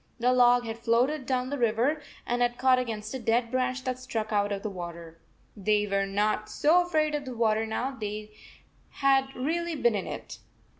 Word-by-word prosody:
The 250 +2 +3
log 245 -1 +5
had 225 0 -5
floated 250 +5 +1
down 255 0 -1
the 285 -4 -1
84 230 - +5 0.2
river 300 +2 0 0.2
and 245 0 -1
had 240 0 +1
caught 255 0 +4
against 220 -3 -4
a 265 - -3
dead 230 0 +1
branch 255 0 -1
that 255 -1 -3
stuck 225 -4 -4
out 205 0 +1
of 200 -1 -3
the 215 - -2
water. 170 -2 -8 0.4
They 210 0 +1
were 195 -1 0
not 210 +2 0
so 320 +10 +4
afraid 310 -3 0
of 295 -1 -1
the 255 -2 -6
water 220 -1 +1
now 245 +4 -2
they 215 -4 -6 0.6
had 270 -1 +2
really 330 +5 -1
been 240 -5 +2
in 200 -3 -2
it. - - -7
240 Hz, 200 wpm, -28 LUFS, 215-260 Hz, 0.6 s, log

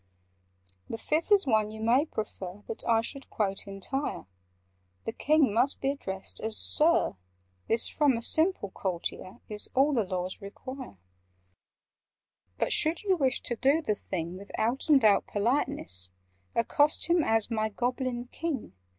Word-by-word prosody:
"The 225 - -4
Fifth 310 - -1
is 405 -4 +7
one 215 -4 +2
you 220 0 -9
may 245 +7 +3
prefer 205 -5 -6
That 225 - -4
I 225 -1 +4
should 275 +4 -5
quote 195 -3 -2
entire:— 200 +9 -3 0.8
The 225 - -3
King 295 -5 +3
must 245 +5 +2
be 270 - +1
addressed 190 -9 -5
as 220 0 +1
'Sir.' 320 - +4 0.5
This, 225 +1 +4
from 285 -6 +2
a 230 - -4
simple 315 - +1
courtier, 185 +3 -4
Is 210 -1 -1
all 280 +3 +4
the 230 -5 +2
Laws 185 +1 -4
require: 210 - -9 1.6
"But, - - +1
should 320 +4 +2
you 385 -2 +3
wish 270 -5 0
to 240 - -3
do 275 +7 +3
the 215 - +1
thing 180 -3 -5
With 200 +1 -12
out 240 +8 -1
and 275 -6 +6
out 205 -2 +4
politeness, 200 - -1 0.5
Accost 290 +6 +2
him 340 -1 +3
as 225 -1 +1
'My 220 -1 0
Goblin 245 +2 -2
King! 310 - -4
230 Hz, 150 wpm, -29 LUFS, 205-280 Hz, 1.6 s, is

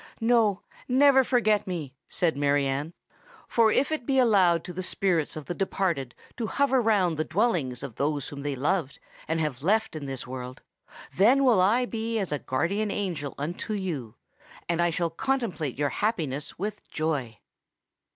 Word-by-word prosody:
"No—never 245 +4 +3
forget 215 -6 +2
me," 160 -7 -4 0.2
said 170 -4 +1
Mary 145 0 +2
Anne; 140 +5 -2 0.5
"for 225 -2 +3
if 280 - +2
it 305 -7 -3
be 270 - +2
allowed 190 -9 +4
to 180 - -7
the 185 - -4
spirits 180 -4 0
of 155 -2 -7
the 175 - -3
departed 175 -8 -1 0.2
to 230 - -2
hover 265 +4 +2
round 195 -8 +2
the 155 - +1
dwellings 160 - 0
of 130 -5 -7
those 145 -1 -1
whom 140 -1 -7
they 145 -1 -2
loved 150 +2 -1 0.3
and 160 +1 0
have 150 -5 -2
left 215 +4 +1
in 145 -3 -5
this 135 -2 -5
world, 125 0 -7 0.5
then 245 +9 +5
will 235 -8 +5
I 230 +7 +3
be 230 -1 -3
as 195 -6 -2
a 150 - -1
guardian 195 +13 -1
angel 175 -9 -3
unto 170 +9 -4
you—and 170 - -5
I 175 - +3
shall 170 0 -1
contemplate 185 - -2
your 145 0 +1
happiness 155 - -2
with 210 +3 -5
joy!" 145 -8 -2
175 Hz, 165 wpm, -27 LUFS, 145-220 Hz, 0.5 s, then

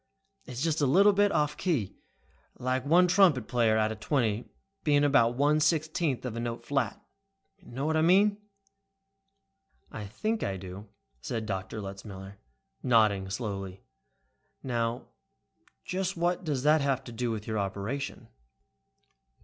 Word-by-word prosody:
It's 125 +2 -4
just 160 -2 0
a 140 - +3
little 200 +9 +5
bit 205 0 +3
off 150 0 +1
key, 150 - -1 0.6
like 130 +1 -1
one 175 +4 +5
trumpet 175 - +4
player 115 -3 +2
out 110 0 +1
of 110 - -7
twenty 115 -2 -1 0.3
being 145 -1 +3
about 135 -5 +4
one 145 +3 +3
sixteenth 155 -3 0
of 120 -3 -4
a - - -3
note 115 0 -4
flat. 140 +1 -1 0.6
Know 130 +4 -5
what 160 +1 +1
I 155 - +3
mean?" 200 +5 +4 1.5
"I 105 -2 -6
think 215 - -2
I 95 -1 -2
do," 95 +3 -9 0.3
said 110 - -4
Letzmiller, 95 0 -6 0.4
nodding 105 -5 +3
slowly. 95 -2 -5 0.8
"Now, 120 -2 -2 0.8
just 185 -1 -2
what 175 +2 0
does 145 -6 -2
that 150 +1 +4
have 135 -2 0
to 120 - -9
do 120 +1 -2
with 110 -2 -4
your 110 -1 -2
operation?" 100 +8 -4
125 Hz, 140 wpm, -29 LUFS, 110-155 Hz, 1.5 s, little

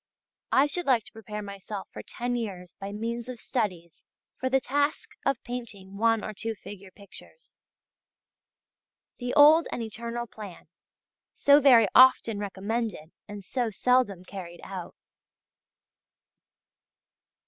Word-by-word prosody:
I 270 - +5
should 345 +3 -3
like 245 -5 +4
to - - -14
prepare 210 -1 -7
myself 200 0 -7
for - - -8
ten 245 +1 -4
years 190 -7 -5
by 195 +1 -6
means 230 +3 -4
of 250 -2 -7
studies 180 -10 -3 0.4
for 260 - -1
the 265 +1 +3
task 285 +3 -1 0.2
of 275 -3 0
painting 210 -6 -7
one 225 0 +2
or 215 - -5
two 225 +2 -4
figure 200 -2 -11
pictures. 200 - -15 1.6
The 245 0 -3
old 310 +3 +7
and 235 - -3
eternal 235 +2 -5
plan 210 -5 -11 0.7
so 285 +1 +6
very 250 -6 +6
often 255 -4 +6
recommended 205 -3 -3 0.2
and 205 -1 -8
so 240 +4 -1
seldom 215 -4 +1
carried 180 -3 -9
out! 185 -3 -7
225 Hz, 125 wpm, -27 LUFS, 200-250 Hz, 1.6 s, old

